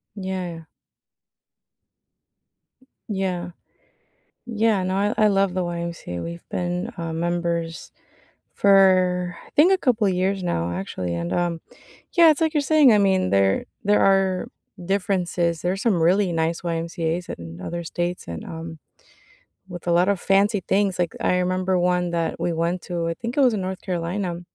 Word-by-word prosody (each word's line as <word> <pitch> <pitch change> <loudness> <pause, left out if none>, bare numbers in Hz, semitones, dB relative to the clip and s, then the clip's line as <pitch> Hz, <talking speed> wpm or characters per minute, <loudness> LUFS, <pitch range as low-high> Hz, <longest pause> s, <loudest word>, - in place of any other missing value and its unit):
Yeah. 185 -4 -5 2.4
Yeah. 185 -3 -2 1.0
Yeah. 220 -4 +1
No, 185 +1 -1
I 205 +2 +1
I 215 - +5
love 195 -2 +2
the 185 - -1
YMCA, 170 - -5
we've 170 0 -8
been, 180 +5 -3
uh, 165 -1 -4
members 170 0 -2 0.6
for, 185 -3 +4
I - - -18
think, 345 +6 +6
a - - +3
couple 240 - +1
years 190 +1 0
now, 85 - -1
actually, 90 -1 -4
and, 85 +1 -3
um 170 -2 -1 0.5
yeah, 340 -2 +7
it's 310 +1 +2
like 320 -1 +1
you're 295 - +2
saying, 285 -4 +5
I 210 - +5
mean, 190 - +2
there 95 0 +2 0.2
there 205 +1 +3
are 195 +1 +2 0.4
differences, 175 -3 0
there 180 +1 0
are - - -4
some 195 -4 +1
really 185 +3 +3
nice 165 0 -1
YMCAs 165 0 -3
in 85 0 -8
other 170 - -4
states 175 +2 -3
and, 85 -1 -6
um, 165 0 -8 0.9
with 175 -2 -9
a 175 - +2
lot 175 +3 +3
of 200 -3 +1
fancy 200 +1 +2
things. 195 -2 +1
Like, 175 -2 -1
I 180 - +2
remember 185 +1 0
1 180 0 +1
that 165 -1 -2
we 175 - 0
went 170 +2 -1
to. 170 -2 -3
I 165 - -2
think 235 - -6
it - - +3
was 255 -4 +4
in 205 - -2
North 185 0 -4
Carolina. 175 0 -3
180 Hz, 160 wpm, -23 LUFS, 170-195 Hz, 2.4 s, yeah